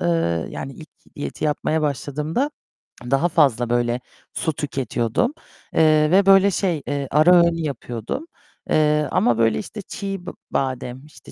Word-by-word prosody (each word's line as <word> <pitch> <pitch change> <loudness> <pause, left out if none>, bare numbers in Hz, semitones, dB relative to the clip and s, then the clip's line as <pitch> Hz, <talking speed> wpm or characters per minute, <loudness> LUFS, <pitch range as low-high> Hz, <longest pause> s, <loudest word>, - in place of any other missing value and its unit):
eee, 165 - 0
yani 135 - -6
ilk 155 - -12 0.3
diyeti 145 - -5
yapmaya 155 +1 0
başladığımda 150 - -1 0.6
daha 135 +6 +3
fazla 130 -8 +2
böyle 120 0 +1 0.3
su 160 - -1
tüketiyordum, 135 - -1 0.4
eee, 155 0 +4
ve 195 +1 +5
böyle 195 0 +6
şey, 175 -4 -1
eee, 140 -1 -2
ara 155 +5 +6
öğün 170 -1 +5
yapıyordum, 120 - -4 0.4
eee, 150 -1 +3
ama 120 -2 +2
böyle 115 -1 +2
işte 210 0 -7
çiğ 195 -1 -6
b 180 - -5 0.2
badem, 130 0 -3
işte 150 - -16
150 Hz, 145 wpm, -22 LUFS, 130-175 Hz, 0.6 s, böyle